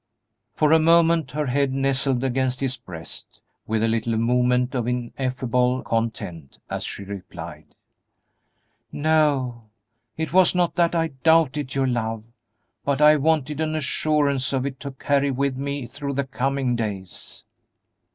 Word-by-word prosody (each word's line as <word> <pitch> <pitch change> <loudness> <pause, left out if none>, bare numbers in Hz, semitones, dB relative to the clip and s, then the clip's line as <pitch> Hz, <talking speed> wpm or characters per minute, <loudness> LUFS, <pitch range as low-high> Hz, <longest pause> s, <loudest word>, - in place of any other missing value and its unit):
For 155 -1 +3
a 160 - +7
moment 165 -2 +4
her 150 +3 -2
head 135 +1 +1
nestled 135 -1 +1
against 130 -1 0
his 130 -2 -1
breast 85 -9 -8 0.3
with 110 0 0
a - - +3
little 115 0 0
movement 125 +2 +2
of 120 -3 -1
ineffable 125 0 -1
content, 110 -10 -3
as - - -2
she 100 - -5
replied, 100 -1 -9 1.2
"No; 145 -6 +1 0.5
it 160 -1 -3
was 185 -1 +5
not 175 -1 +2
that 170 -1 +2
I 165 -1 +1
doubted 150 -3 +3
your 135 -1 +2
love, 115 -3 -1 0.6
but 140 -1 0
I 150 0 +7
wanted 150 -1 +1
an 155 0 -1
assurance 140 -2 +1
of 130 -1 0
it 135 -2 -4
to 140 - -6
carry 140 +1 +1
with 135 0 0
me 140 0 -3
through 140 +3 -5
the 140 - +1
coming 135 -1 -1
days." 100 -5 -5
135 Hz, 140 wpm, -23 LUFS, 125-150 Hz, 1.2 s, a